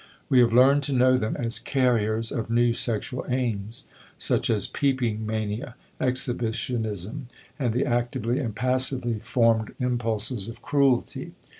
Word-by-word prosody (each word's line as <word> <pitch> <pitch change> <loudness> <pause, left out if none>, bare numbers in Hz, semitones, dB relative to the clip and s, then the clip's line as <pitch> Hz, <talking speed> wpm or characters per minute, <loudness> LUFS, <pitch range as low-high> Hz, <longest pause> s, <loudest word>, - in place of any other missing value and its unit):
We 130 - +5
have 120 -1 +5
learned 135 +4 +5
to 140 - -2
know 130 0 +4
them 110 -4 -1
as 115 -1 -2
carriers 115 -4 +1
of 115 -1 -3
new 120 0 +3
sexual 120 +2 -1
aims, 115 -4 -1 0.3
such - - 0
as - - +2
peeping 120 -6 -1
mania, 110 +3 -3 0.2
exhibitionism, 120 -2 -2 0.3
and 125 -4 +1
the 125 +4 0
actively 120 0 -1
and 115 -7 -3
passively 125 -1 +1
formed 115 -1 +1
impulses 115 -3 -1
of 115 - -10
cruelty. 135 -4 +1
120 Hz, 135 wpm, -25 LUFS, 110-130 Hz, 0.3 s, We